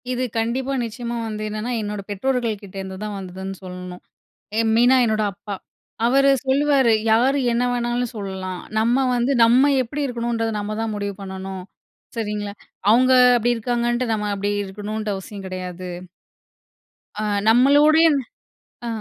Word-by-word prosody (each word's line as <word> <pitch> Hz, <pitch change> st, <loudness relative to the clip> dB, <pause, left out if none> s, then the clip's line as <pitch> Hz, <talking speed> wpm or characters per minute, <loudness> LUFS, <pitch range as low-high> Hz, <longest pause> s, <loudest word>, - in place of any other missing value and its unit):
இது 255 Hz, 0 st, -1 dB
கண்டிப்பா, 250 Hz, +4 st, -1 dB
நிச்சயமா 235 Hz, +1 st, -5 dB
வந்து 215 Hz, -1 st, -5 dB
என்னன்னா 215 Hz, +3 st, -4 dB
என்னோட 210 Hz, -1 st, -4 dB
பெற்றோர்கள் 230 Hz, 0 st, -1 dB
கிட்டேருந்துதான் 195 Hz, +1 st, -6 dB
வந்ததுன்னு 190 Hz, 0 st, -6 dB
சொல்லணும். 180 Hz, -1 st, -8 dB, 0.6 s
எ -, -, +4 dB
மெயினா 245 Hz, +3 st, +5 dB
என்னோட 215 Hz, -2 st, +1 dB
அப்பா. 200 Hz, +1 st, -7 dB, 0.5 s
அவர் 275 Hz, +3 st, +4 dB, 0.2 s
சொல்லுவாரு, 270 Hz, -2 st, +3 dB, 0.2 s
யாரு 250 Hz, +6 st, +4 dB
என்ன 235 Hz, +1 st, +1 dB
வேணாலும் 240 Hz, 0 st, -1 dB
சொல்லலாம். 190 Hz, -2 st, -5 dB, 0.2 s
நம்ம 240 Hz, +4 st, +2 dB
வந்து 245 Hz, +3 st, +1 dB
நம்ம 255 Hz, +5 st, +5 dB
எப்படி 285 Hz, +4 st, -4 dB
இருக்கணுன்றது 235 Hz, -2 st, -2 dB
நம்ம 210 Hz, +1 st, -4 dB
தான் 225 Hz, -1 st, -2 dB
முடிவு 205 Hz, -1 st, -3 dB
பண்ணணும். 190 Hz, -1 st, -6 dB, 0.5 s
சரிங்களா? 210 Hz, -2 st, -3 dB, 0.4 s
அவங்க 255 Hz, +3 st, +5 dB, 0.2 s
அப்படி 240 Hz, +1 st, +2 dB
இருக்காங்கன்ட்டு 240 Hz, +1 st, 0 dB
நம்ம 210 Hz, -1 st, -2 dB
அப்படி 200 Hz, +1 st, -1 dB
இருக்கணுன்ற 210 Hz, +2 st, -5 dB
அவசியம் 195 Hz, +1 st, -8 dB
கிடையாது. 185 Hz, -1 st, -6 dB, 1.3 s
ஆ -, -, -1 dB, 0.2 s
நம்மளூடைய 290 Hz, +7 st, +6 dB, 0.8 s
ஆ. -, -, -3 dB
225 Hz, 130 wpm, -22 LUFS, 200-245 Hz, 1.3 s, நம்மளூடைய